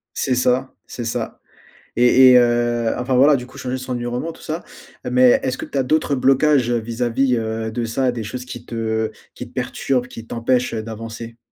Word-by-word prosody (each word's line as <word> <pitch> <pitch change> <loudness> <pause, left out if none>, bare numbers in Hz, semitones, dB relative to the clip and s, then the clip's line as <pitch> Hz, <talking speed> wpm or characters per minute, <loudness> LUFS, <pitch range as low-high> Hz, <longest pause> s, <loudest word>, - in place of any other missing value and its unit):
C'est 130 - 0
ça, 125 +1 +1
c'est 120 - -6
ça. 115 - -4 0.6
Et 125 +2 +6
et 125 - +8
heu, 120 -1 +2
enfin 125 +1 -1
voilà, 140 +4 +6
du 125 -2 -4
coup - - -15
changer 130 0 -3
son 130 0 -7
environnement 120 +6 -3
tout - - -16
ça, 160 +2 -5 0.4
heu, 125 - -3
mais 125 0 +5
est-ce 130 - -1
que - - -4
tu - - -5
as 135 - +2
d'autres 145 +1 +1
blocages 135 0 +3
vis-à-vis, 120 +2 0
heu, 110 0 -3
de 115 +1 -2
ça, 125 +3 0
des 115 -2 -5
choses 125 +4 -6
qui 120 -2 -9
te 110 -1 -2 0.2
qui - - -7
te - - -20
perturbent, 125 -2 -1
qui 115 -2 -10
t'empêchent, 120 +2 0
heu, 110 - -2
d'avancer? 115 +1 -8
125 Hz, 205 wpm, -20 LUFS, 115-130 Hz, 0.6 s, et